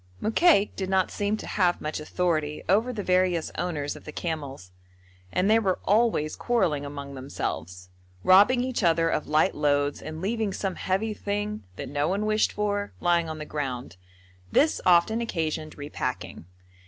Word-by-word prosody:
Mokaik 225 - +3
did 190 -1 -3
not 190 -1 +2
seem 205 +1 -1
to - - -8
have 180 -3 +1
much 155 +1 -4
authority 155 -2 -1
over 215 +8 +3
the 215 -4 -4
various 180 -3 +1
owners 150 -5 -2
of - - -12
the 150 - -8
camels, 140 - -5 0.6
and 185 - +1
they 220 +2 +5
were 190 -4 0
always 210 -8 +2
quarrelling 185 -12 0
among 140 -1 -7
themselves, 90 - -5 0.3
robbing 205 +7 +6
each 255 -2 -2
other 165 -2 +3
of 155 - -1
light 155 +2 +3
loads 145 -1 +1
and 155 0 -7
leaving 210 +2 -1
some 195 -1 -2
heavy 195 +5 -1
thing, 205 +1 -3
that - - -6
no 145 0 -1
one 200 +4 0
wished 215 0 +2
for, 205 -1 -2
lying 170 -2 +2
on 155 - -5
the 155 - -6
ground; 135 -8 -4 0.5
this 305 +2 +3
often 185 +6 +4
occasioned 160 -7 -3
re 145 0 -6
packing. 115 - -4
180 Hz, 165 wpm, -26 LUFS, 150-205 Hz, 0.6 s, robbing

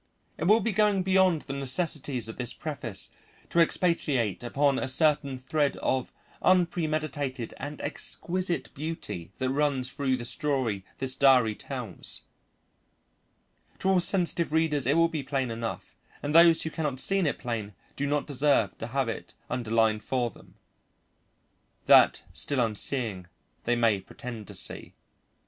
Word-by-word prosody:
It 160 - -1
will 215 +5 +5
be 230 - 0
going 205 -1 +2
beyond 185 -4 +3
the 135 - -6
necessities 135 -2 -1
of 110 - -8
this 125 -2 -3
preface 135 -10 -3 0.4
to 170 - +2
expatiate 150 - +2
upon 140 +3 +1
a - - -2
certain 140 -1 +2
thread 140 +2 0
of 130 -1 -1 0.3
unpremeditated 155 -8 0
and 145 +1 -6
exquisite 175 +4 -3
beauty 140 - -5
that 130 0 -1
runs 135 -3 0
through 140 -2 0
the 120 - -6
story 130 - -1
this 130 -1 -1
diary 130 -5 +5
tells. 120 -5 -2 1.5
To 190 - 0
all 190 -1 +4
sensitive 175 -3 +1
readers 155 -5 +1
it 145 +4 +3
will 165 0 +5
be 160 -3 -3
plain 135 -2 -2
enough, 115 0 -6 0.2
and 145 +1 -2
those 165 0 +7
who 160 - -3
cannot 150 -5 -2
see 195 +7 +3
it 160 -7 0
plain 110 -5 -4 0.2
do 145 - -2
not 145 0 0
deserve 140 - +2
to 115 - -4
have 135 +1 -1
it 115 - -6 0.2
underlined 110 -3 +1
for 125 -3 -1
them, - - -18 1.3
that, - - +6
still 140 - 0
unseeing, 110 -4 -1 0.4
they 120 - +2
may 115 -4 +3
pretend 110 +1 -8
to - - -8
see. - - -4
140 Hz, 145 wpm, -28 LUFS, 120-160 Hz, 1.5 s, those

